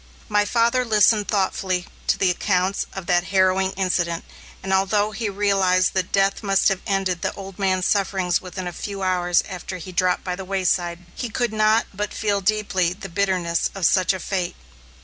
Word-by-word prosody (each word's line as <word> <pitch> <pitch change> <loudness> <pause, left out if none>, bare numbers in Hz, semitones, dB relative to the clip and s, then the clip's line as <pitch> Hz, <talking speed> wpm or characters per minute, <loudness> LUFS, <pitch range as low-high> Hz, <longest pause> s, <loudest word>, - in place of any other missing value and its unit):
My 210 -1 +2
father 235 +3 +2
listened 215 -2 +3
thoughtfully 190 -2 0 0.2
to - - +2
the 185 -2 +2
accounts 185 +1 0
of 195 -2 -6
that 175 0 +2
harrowing 190 +1 +2
incident, 180 -3 -1 0.4
and 190 0 -1
although 205 +2 +2
he 215 +1 -3
realized 195 -2 +2
that 185 -1 -1
death 195 0 +2
must 195 -2 +3
have 195 -1 -2
ended 190 -3 0
the - - -1
old 195 0 -10
man's 185 -2 +1
sufferings 190 -3 +1
within 185 0 -6
a 175 - -4
few 195 +2 -5
hours 180 -2 +2
after 185 -1 -6
he 185 +1 -9
dropped 180 0 +1
by 180 -1 -3
the 190 - -7
wayside, 180 -2 -1
he 245 - -4
could 235 0 -1
not 215 +1 +3
but 205 +1 -4
feel 205 -2 0
deeply 190 -3 +1
the 195 - -9
bitterness 180 -2 0
of 195 -3 -1
such 185 +2 +3
a 190 - -3
fate. 185 -2 -3
190 Hz, 185 wpm, -22 LUFS, 180-200 Hz, 0.4 s, listened